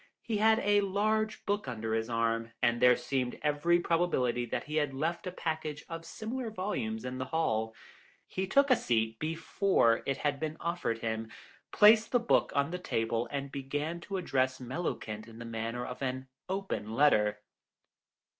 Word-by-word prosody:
He 220 Hz, -2 st, -1 dB
had 220 Hz, +1 st, +5 dB
a 205 Hz, 0 st, +4 dB
large 215 Hz, +2 st, 0 dB
book 205 Hz, -5 st, -1 dB
under 110 Hz, -2 st, -3 dB
his 110 Hz, +1 st, -1 dB
arm, 115 Hz, 0 st, 0 dB
and 120 Hz, -1 st, +2 dB
there 125 Hz, 0 st, +7 dB
seemed 125 Hz, 0 st, -2 dB
every 150 Hz, +4 st, +3 dB
probability 130 Hz, -9 st, +1 dB
that -, -, -2 dB
he 155 Hz, +1 st, -3 dB
had 145 Hz, -3 st, 0 dB
left 165 Hz, +6 st, -2 dB
a -, -, -2 dB
package 155 Hz, -3 st, -4 dB
of 165 Hz, 0 st, -7 dB
similar 230 Hz, +2 st, -4 dB
volumes 220 Hz, +2 st, -3 dB
in 125 Hz, +1 st, -4 dB
the 130 Hz, -, -2 dB
hall. 110 Hz, -8 st, 0 dB, 0.5 s
He 190 Hz, 0 st, -3 dB
took 280 Hz, +7 st, +4 dB
a -, -, +8 dB
seat 110 Hz, -, 0 dB
before 160 Hz, -5 st, +2 dB
it 135 Hz, -, 0 dB
had 145 Hz, -2 st, -1 dB
been 155 Hz, 0 st, -3 dB
offered 170 Hz, -9 st, -1 dB
him, 110 Hz, 0 st, -2 dB, 0.4 s
placed 215 Hz, +1 st, +6 dB
the 245 Hz, -, +5 dB
book 235 Hz, -, +2 dB
on 140 Hz, +2 st, +1 dB
the 180 Hz, -, -3 dB
table, 115 Hz, -6 st, -1 dB
and 140 Hz, 0 st, -4 dB
began 145 Hz, +5 st, -3 dB
to 195 Hz, +2 st, -4 dB
address 130 Hz, -7 st, 0 dB
Mellowkent 120 Hz, -5 st, -4 dB
in 115 Hz, -1 st, -12 dB
the 120 Hz, -, -7 dB
manner 115 Hz, +2 st, -3 dB
of 125 Hz, -, -7 dB
an 130 Hz, 0 st, -3 dB, 0.2 s
"open 190 Hz, -, -3 dB
letter." 105 Hz, -7 st, +4 dB
145 Hz, 175 wpm, -31 LUFS, 120-185 Hz, 0.5 s, a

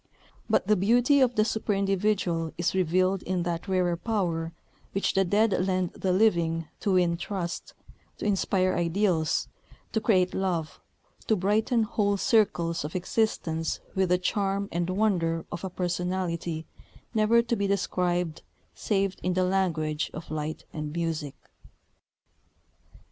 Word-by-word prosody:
But -, -, +3 dB
the 210 Hz, -, +4 dB
beauty 245 Hz, +8 st, +4 dB
of 250 Hz, -2 st, +3 dB
the 215 Hz, -, +4 dB
superindividual 195 Hz, -5 st, 0 dB
is 175 Hz, +1 st, 0 dB
revealed 185 Hz, +1 st, +2 dB
in 185 Hz, -1 st, -1 dB
that 170 Hz, +1 st, -3 dB
rarer 180 Hz, -2 st, +1 dB
power 170 Hz, -4 st, -1 dB, 0.4 s
which 195 Hz, -, 0 dB
the 195 Hz, -, +3 dB
dead 210 Hz, +4 st, +2 dB
lend 185 Hz, -1 st, 0 dB
the 190 Hz, -, -1 dB
living 170 Hz, -5 st, +2 dB
to 200 Hz, -, 0 dB
win 175 Hz, -2 st, +3 dB
trust, 175 Hz, -1 st, -5 dB, 0.4 s
to -, -, -5 dB
inspire 190 Hz, -2 st, +1 dB
ideals, 170 Hz, -2 st, +1 dB, 0.4 s
to 220 Hz, -, 0 dB
create 185 Hz, -5 st, +3 dB
love, 175 Hz, -5 st, -2 dB, 0.5 s
to 220 Hz, -, +4 dB
brighten 215 Hz, +5 st, +2 dB
whole 205 Hz, -1 st, 0 dB
circles 175 Hz, -7 st, +2 dB
of 150 Hz, +3 st, -6 dB
existence 175 Hz, -4 st, -1 dB
with 190 Hz, -1 st, +1 dB
the 180 Hz, -, +4 dB
charm 195 Hz, +2 st, -1 dB
and 175 Hz, +1 st, -1 dB
wonder 180 Hz, -5 st, +1 dB
of 175 Hz, -, -5 dB
a 190 Hz, -, -2 dB
personality 175 Hz, -2 st, -2 dB, 0.5 s
never 225 Hz, +1 st, +4 dB
to 235 Hz, 0 st, 0 dB
be 200 Hz, -2 st, 0 dB
described 180 Hz, -4 st, 0 dB, 0.3 s
save 195 Hz, -2 st, 0 dB
in 180 Hz, 0 st, -1 dB
the 185 Hz, -, +2 dB
language 165 Hz, -5 st, 0 dB
of 160 Hz, -, -8 dB
light 155 Hz, 0 st, -4 dB
and 150 Hz, -1 st, -4 dB
music. 160 Hz, -4 st, -2 dB
185 Hz, 140 wpm, -27 LUFS, 170-200 Hz, 0.5 s, the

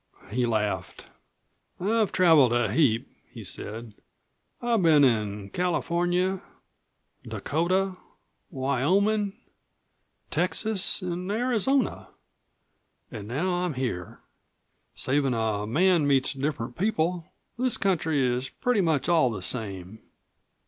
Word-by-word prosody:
He 120 Hz, +2 st, +1 dB
laughed. 105 Hz, -3 st, -2 dB, 0.7 s
"I've 215 Hz, +3 st, +1 dB
traveled 160 Hz, -9 st, +5 dB
a 120 Hz, -4 st, +1 dB
heap," 125 Hz, -8 st, +2 dB, 0.2 s
he -, -, -10 dB
said. 110 Hz, 0 st, -5 dB, 0.7 s
"I've 235 Hz, -3 st, +1 dB
been 155 Hz, -4 st, +5 dB
in 105 Hz, -5 st, 0 dB
California, 180 Hz, +1 st, 0 dB, 0.8 s
Dakota, 185 Hz, +5 st, -1 dB, 0.5 s
Wyoming, 185 Hz, -, +1 dB, 1.0 s
Texas, 210 Hz, -2 st, 0 dB
an' 180 Hz, +1 st, -4 dB
Arizona. 245 Hz, +2 st, 0 dB, 1.0 s
An' 105 Hz, -1 st, -7 dB
now 155 Hz, +11 st, -1 dB
I'm 175 Hz, -4 st, -1 dB
here. 120 Hz, -10 st, -4 dB, 0.7 s
Savin' 135 Hz, -1 st, +1 dB
a 110 Hz, -2 st, -1 dB
man 170 Hz, -, +3 dB
meets 135 Hz, -2 st, +3 dB
different 135 Hz, -3 st, -3 dB
people, 175 Hz, -4 st, -1 dB, 0.3 s
this 255 Hz, -2 st, 0 dB
country 160 Hz, -7 st, +1 dB
is 125 Hz, +1 st, -1 dB
pretty 245 Hz, -5 st, 0 dB
much 160 Hz, -6 st, +1 dB
all 165 Hz, -7 st, +4 dB
the 105 Hz, -5 st, -5 dB
same." 100 Hz, -2 st, -4 dB
155 Hz, 100 wpm, -26 LUFS, 120-185 Hz, 1.0 s, traveled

